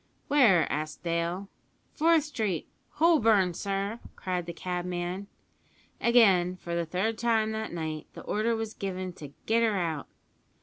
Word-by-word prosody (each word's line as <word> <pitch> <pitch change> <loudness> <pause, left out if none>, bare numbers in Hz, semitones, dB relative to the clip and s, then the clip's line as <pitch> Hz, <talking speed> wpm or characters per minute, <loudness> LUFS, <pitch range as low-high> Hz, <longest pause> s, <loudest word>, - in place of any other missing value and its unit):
"Where?" 240 - +5
asked 155 +3 -4
Dale. 170 +3 -1 0.5
"Forth 325 0 +4
Street, 220 - -2 0.3
Holborn, 225 - +4
sir!" 200 +4 -2 0.2
cried 180 -2 -3
the - - -3
cabman. 180 +2 -3 0.7
Again, 195 -7 +5
for 170 -1 -6
the 170 -1 -1
third 205 +6 -1
time 225 -2 +2
that 220 0 -4
night, 160 -2 -4
the - - -9
order 225 +2 0
was 225 -1 -4
given 185 -2 -4
to 145 -5 -10
"get 230 +1 +3
her 220 -3 +2
out." 160 -5 -2
190 Hz, 140 wpm, -28 LUFS, 175-225 Hz, 0.7 s, Where